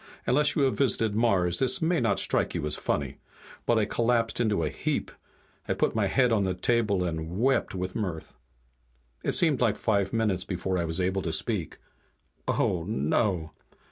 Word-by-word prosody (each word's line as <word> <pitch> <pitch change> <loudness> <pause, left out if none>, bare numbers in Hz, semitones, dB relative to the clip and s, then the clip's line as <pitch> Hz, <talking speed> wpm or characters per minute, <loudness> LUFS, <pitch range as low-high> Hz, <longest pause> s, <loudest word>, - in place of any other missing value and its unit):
Unless 150 +3 +3
you 145 - +2
have 135 - +2
visited 115 -6 +1
Mars 95 -6 +2
this 160 +9 +3
may 165 0 +1
not 110 -5 +1
strike - - 0
you - - -2
as 75 - +1
funny, - - -2 0.5
but 120 - +3
I 110 - +2
collapsed 115 0 0
into 105 -8 +1
a 75 - 0
heap. - - -3 0.6
I - - 0
put - - 0
my 110 -3 +1
head 125 +4 +2
on 105 -3 +2
the 95 -1 -1
table 105 -2 +1
and 85 +1 -4
wept 135 -4 +1
with 90 0 -3
mirth. 90 -7 -4 0.9
It - - 0
seemed 155 -8 +3
like 115 -4 +2
five 100 -4 0
minutes 105 -5 0
before 90 0 -2
I 85 - -1
was 80 +2 -2
able 95 +1 0
to 85 - -3
speak. 90 +1 -1 0.7
"Oh, 85 -2 0
no!" 85 - 0
100 Hz, 180 wpm, -27 LUFS, 90-120 Hz, 0.9 s, Unless